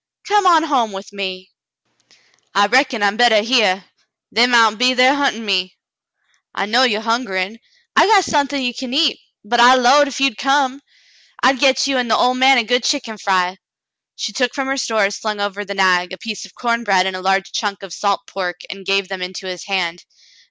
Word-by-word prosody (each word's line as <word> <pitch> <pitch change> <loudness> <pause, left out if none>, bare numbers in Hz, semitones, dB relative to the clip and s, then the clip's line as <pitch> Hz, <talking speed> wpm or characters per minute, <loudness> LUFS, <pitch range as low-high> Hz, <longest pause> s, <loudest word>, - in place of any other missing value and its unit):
Come 410 -1 +2
on 330 -3 +5
home 255 -9 0
with 195 +1 -10
me." 185 -2 -6 1.0
"I 200 +1 +4
reckon 250 0 +1
I'm 200 +1 +1
bettah 230 -3 +4
hyar. 210 -6 +1 0.5
They 235 +3 +3
mount 230 -3 +3
be 255 +1 +3
thar 255 +2 +5
huntin' 275 -6 -1
me." 185 -2 -1 0.8
"I 195 - -2
know 230 +5 +2
you're 225 -4 +1
hungerin*. 225 -3 -2 0.4
I - - +5
got 400 -4 +4
suthin' 285 -3 -1
ye 245 -1 -1
can 260 +1 -6
eat, 310 +1 +2 0.3
but 240 +3 0
I 245 +2 +7
'lowed 265 +4 +4
if 275 - -6
you'd 270 -5 0
come, 275 0 0 0.6
I'd 260 0 +3
get 270 0 +3
you 270 -2 0
an' 245 - -1
the 220 - +2
ol' 250 - +2
man 260 +1 +4
a 240 - +3
good 245 +3 0
chick'n 245 -7 -2
fry." 185 -1 -1 0.6
She 210 - -5
took 250 0 -1
from 270 -1 -3
her 270 - -1
stores, 215 -5 -1
slung 215 -2 -4
over 205 0 -3
the 200 0 -7
nag, 185 -2 +1
a - - -7
piece 215 -3 -7
of - - -24
corn 235 -1 -2
bread 190 -4 +2
and 190 -1 -3
a 185 - -6
large 195 +1 0
chunk 200 -3 -4
of 190 -3 -9
salt 200 +1 -1
pork, 180 -2 -5
and 195 -1 -11
gave 195 -1 +1
them 190 -1 -7
into 185 +1 -7
his 180 -2 -7
hand. 180 -3 -3
225 Hz, 205 wpm, -18 LUFS, 195-255 Hz, 1.0 s, I